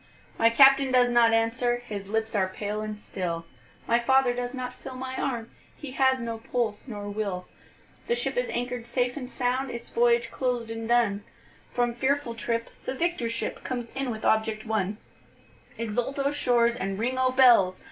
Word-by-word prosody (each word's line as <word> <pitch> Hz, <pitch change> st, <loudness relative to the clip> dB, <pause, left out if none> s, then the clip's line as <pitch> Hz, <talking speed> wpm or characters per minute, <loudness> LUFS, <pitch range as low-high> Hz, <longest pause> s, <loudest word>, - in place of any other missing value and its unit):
My 230 Hz, -, +6 dB
Captain 270 Hz, +2 st, +6 dB
does 250 Hz, -1 st, +5 dB
not 240 Hz, -1 st, +5 dB
answer, 230 Hz, +2 st, +1 dB
his 200 Hz, -4 st, -6 dB
lips 220 Hz, +2 st, -1 dB
are 195 Hz, -3 st, +2 dB
pale 205 Hz, +2 st, -4 dB
and 215 Hz, -1 st, -5 dB
still, 170 Hz, -5 st, -4 dB, 0.4 s
My 235 Hz, +1 st, +3 dB
father 265 Hz, 0 st, +3 dB
does 245 Hz, 0 st, -3 dB
not 250 Hz, -1 st, -4 dB
feel 255 Hz, +1 st, -9 dB
my 260 Hz, 0 st, -5 dB
arm, 235 Hz, -4 st, -3 dB, 0.3 s
he 290 Hz, -3 st, -8 dB
has 265 Hz, 0 st, +3 dB
no 230 Hz, -1 st, -4 dB
pulse 230 Hz, -1 st, -2 dB
nor 205 Hz, -4 st, -6 dB
will, 200 Hz, -3 st, -3 dB, 0.6 s
The 475 Hz, -, +2 dB
ship -, -, -1 dB
is -, -, 0 dB
anchor'd 245 Hz, -1 st, -3 dB
safe 245 Hz, 0 st, 0 dB
and 255 Hz, -4 st, -6 dB
sound, 255 Hz, +1 st, -1 dB
its 235 Hz, -1 st, -7 dB
voyage 235 Hz, 0 st, +2 dB
closed 245 Hz, -3 st, -2 dB
and 225 Hz, 0 st, -5 dB
done, 225 Hz, -4 st, +2 dB, 0.5 s
From 240 Hz, -1 st, 0 dB
fearful 265 Hz, 0 st, 0 dB
trip 230 Hz, +1 st, -3 dB
the 260 Hz, -, -3 dB
victor 335 Hz, -6 st, -1 dB
ship 230 Hz, 0 st, -4 dB
comes 245 Hz, -2 st, -4 dB
in 270 Hz, -1 st, -3 dB
with 220 Hz, -2 st, -5 dB
object 220 Hz, 0 st, +1 dB
won; 210 Hz, -2 st, -1 dB, 0.8 s
Exult 230 Hz, +4 st, -2 dB
O 280 Hz, 0 st, +1 dB
shores 240 Hz, -4 st, +2 dB
and 195 Hz, -4 st, -3 dB
ring 250 Hz, +4 st, -1 dB
O 260 Hz, 0 st, +3 dB
bells! 240 Hz, -8 st, +5 dB
240 Hz, 180 wpm, -27 LUFS, 220-255 Hz, 0.8 s, My